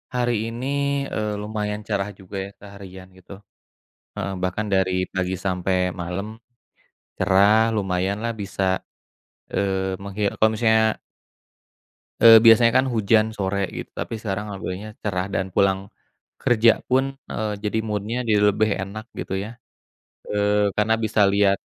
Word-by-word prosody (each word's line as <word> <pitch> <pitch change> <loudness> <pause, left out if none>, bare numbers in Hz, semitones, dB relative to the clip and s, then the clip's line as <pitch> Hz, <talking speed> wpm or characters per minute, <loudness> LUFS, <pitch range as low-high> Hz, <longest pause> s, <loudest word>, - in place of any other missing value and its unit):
hari 120 -1 +1
ini, 115 +2 -5 0.5
eee, 105 -1 -1
lumayan 105 0 -3
cerah 100 -1 -1
juga 95 +1 -11
ya - - -9
seharian 95 -2 -11
gitu. 95 +1 -17 0.8
Heeh, 100 - -3
bahkan 90 +4 -1
dari 95 -1 +2 0.2
pagi 95 0 -1
sampe 90 -1 -1 0.3
malem 90 +4 -4 0.9
cerah 105 +4 +4
lumayan 95 -1 -1
lah 115 - 0
bisa, 100 0 -3 0.9
eee, 95 -1 0
memghi 100 +1 -5
apa - - -2
maksudnya 110 0 +2 1.3
eee, 115 -1 +10
biasanya 115 +1 +6
kan 130 - -2
hujan 110 -2 +3
sore 100 -1 -1
gitu - - -7
tapi - - -5
sekarang 105 -1 -4
alhamdulillahnya 100 +1 -6
cerah 95 -3 -1
dan 95 -1 -2
pulang 95 +1 +1 0.5
kerja 115 -1 +4
pun 130 +1 +3 0.2
heeh, 110 -1 -3
jadi 105 +1 0
mood-nya 105 +2 -3
jadi 105 -2 +3
lebih 110 +2 +1
enak 105 +3 -7 0.2
gitu - - -4
ya, 105 - -7 0.8
eee 105 -1 +1
karena 105 +1 +2
bisa 110 -1 0
liat 100 0 +3
105 Hz, 135 wpm, -23 LUFS, 95-110 Hz, 1.3 s, eee